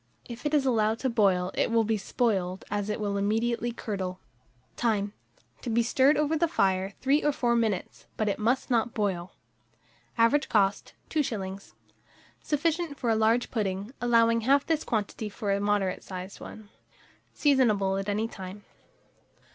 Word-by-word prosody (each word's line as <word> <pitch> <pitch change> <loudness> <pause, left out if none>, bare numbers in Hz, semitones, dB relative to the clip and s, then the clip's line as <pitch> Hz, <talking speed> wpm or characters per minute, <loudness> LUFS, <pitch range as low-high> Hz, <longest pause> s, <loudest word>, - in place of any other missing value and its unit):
If 245 +4 -5
it 300 - +1
is 280 -2 +2
allowed 220 -3 +2
to 260 - 0
boil, 190 -5 +2
it - - +1
will 230 0 +3
be 220 +1 0
spoiled, 195 -3 -1
as 205 0 -1
it 210 - -2
will 200 -1 -1
immediately 230 +4 0
curdle. 190 -6 -4 0.6
Time. 205 -3 0 0.5
To 245 - -5
be 235 +1 +2
stirred 265 +5 +3
over 300 +1 +1
the 335 +2 +2
fire 190 - 0
3 275 +3 +2
or 295 - +3
4 240 -4 +1
minutes; 220 -5 -2
but 215 - 0
it 200 - -1
must 240 +5 0
not 235 0 +1
boil. 190 -4 -2 0.8
Average 235 +6 +3
cost, 200 -2 +1 0.2
2s. 200 -10 -3 0.7
Sufficient 315 0 -1
for 240 -3 0
a - - +3
large 225 +2 +2
pudding; 200 0 -2
allow 230 -1 +4
half 275 +5 +3
this 320 -2 0
quantity 215 -1 -2
for 205 0 -3
a 200 - +1
moderate 205 -2 0
sized 185 0 -8
one. 215 -1 -10 0.6
Seasonable 215 -9 +2
at 195 +1 -4
any 215 +2 0
time. 195 -1 -9
220 Hz, 160 wpm, -28 LUFS, 200-245 Hz, 0.8 s, allow